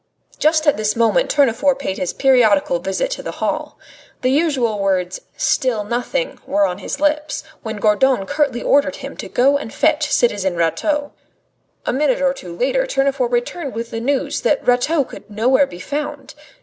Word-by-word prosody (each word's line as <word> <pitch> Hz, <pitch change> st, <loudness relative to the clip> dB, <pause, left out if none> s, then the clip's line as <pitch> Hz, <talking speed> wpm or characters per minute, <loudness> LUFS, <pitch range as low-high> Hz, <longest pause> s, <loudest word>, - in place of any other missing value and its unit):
Just 310 Hz, +1 st, +3 dB
at 295 Hz, -, +3 dB
this 215 Hz, 0 st, 0 dB
moment 235 Hz, -, +2 dB
Tournefort 280 Hz, 0 st, +2 dB
paid 190 Hz, -9 st, -4 dB
his 180 Hz, -, -1 dB
periodical 220 Hz, -9 st, +3 dB
visit 195 Hz, -, -2 dB
to -, -, -4 dB
the -, -, -6 dB
hall. -, -, -3 dB, 0.5 s
The 255 Hz, -, +2 dB
usual 265 Hz, -8 st, +1 dB
words, 185 Hz, -2 st, -1 dB, 0.2 s
"Still 240 Hz, -5 st, +1 dB
nothing," 245 Hz, -, -2 dB
were 200 Hz, 0 st, +2 dB
on 180 Hz, 0 st, -3 dB
his 245 Hz, -, -5 dB
lips, 300 Hz, +1 st, 0 dB, 0.2 s
when 220 Hz, -2 st, -5 dB
Gourdon 210 Hz, +1 st, +2 dB
curtly 275 Hz, +1 st, -1 dB
ordered 280 Hz, 0 st, +2 dB
him 275 Hz, 0 st, -8 dB
to -, -, -7 dB
go 275 Hz, +3 st, +3 dB
and 225 Hz, -, -7 dB
fetch 310 Hz, -1 st, +2 dB
the -, -, -3 dB
citizen 200 Hz, -6 st, +1 dB
Rateau. 175 Hz, -, 0 dB, 0.7 s
A -, -, 0 dB
minute 270 Hz, -1 st, +1 dB
or 275 Hz, -1 st, +2 dB
two 175 Hz, -10 st, -10 dB
later -, -, +1 dB
Tournefort 275 Hz, -, 0 dB
returned 250 Hz, +4 st, -2 dB
with 230 Hz, +1 st, -5 dB
the 225 Hz, -, -4 dB
news 270 Hz, +2 st, -1 dB
that -, -, 0 dB
Rateau 265 Hz, +5 st, +3 dB
could 245 Hz, -, -12 dB
nowhere 250 Hz, +6 st, +2 dB
be 175 Hz, -, -11 dB
found. 285 Hz, +5 st, -5 dB
255 Hz, 175 wpm, -19 LUFS, 215-290 Hz, 0.7 s, Just